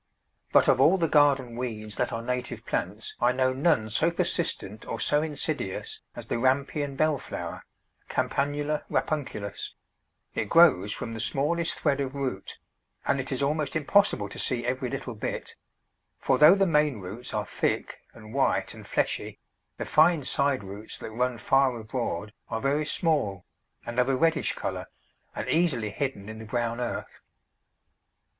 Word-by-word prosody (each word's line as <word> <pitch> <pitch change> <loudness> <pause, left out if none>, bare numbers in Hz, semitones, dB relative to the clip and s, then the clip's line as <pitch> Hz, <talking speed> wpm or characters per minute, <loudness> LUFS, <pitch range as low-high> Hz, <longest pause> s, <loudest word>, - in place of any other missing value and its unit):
But - - +5
of - - +4
all 185 +4 +6
the 165 -3 +1
garden 140 -6 +3
weeds 110 -4 -4
that - - 0
are 115 0 -4
native 125 +1 -3
plants 105 +5 -3
I 120 +1 +5
know 130 0 +1
none 135 -5 +2
so 160 +10 +3
persistent 170 - -1
or - - -4
so 150 0 +3
insidious 150 -9 -2
as - - -5
the - - -2
Rampion 140 +2 +1
Bell 155 0 +2
flower - - -6 0.5
(Campanula 145 +2 0
Rapunculus); 130 -10 -2 0.6
it - - -2
grows 140 - +6
from 115 - -4
the 110 - -6
smallest 150 +9 +1
thread 140 -2 +1
of 135 0 -3
root, 130 -8 -4 0.5
and 140 - +1
it 130 - -8
is 135 +1 0
almost 150 +2 0
impossible 155 - +3
to - - -8
see 120 -2 0
every 125 0 -1
little 135 -2 -4
bit; 105 - -5 0.6
for 130 - +1
though 155 +5 +9
the 195 -1 +3
main 150 - +2
roots 100 +7 -7
are 105 -2 -1
thick, - - -2
and 110 0 -13
white, 135 0 +1
and - - -11
fleshy, - - -1 0.4
the - - -4
fine 160 -1 +4
side 140 -3 +2
roots 100 +3 -7
that - - -7
run 125 +2 0
far 130 0 +2
abroad 110 -4 -3 0.2
are 110 - -2
very 145 +4 0
small, 145 - +1 0.4
and 120 +1 -2
of 125 +1 +3
a 135 - +3
reddish 165 +4 +2
colour, - - -4 0.5
and - - -4
easily 135 -11 +1
hidden 110 -4 -3
in 110 0 -7
the 110 - -8
brown 120 +1 -2
earth. 120 - -4
130 Hz, 165 wpm, -27 LUFS, 115-150 Hz, 0.6 s, though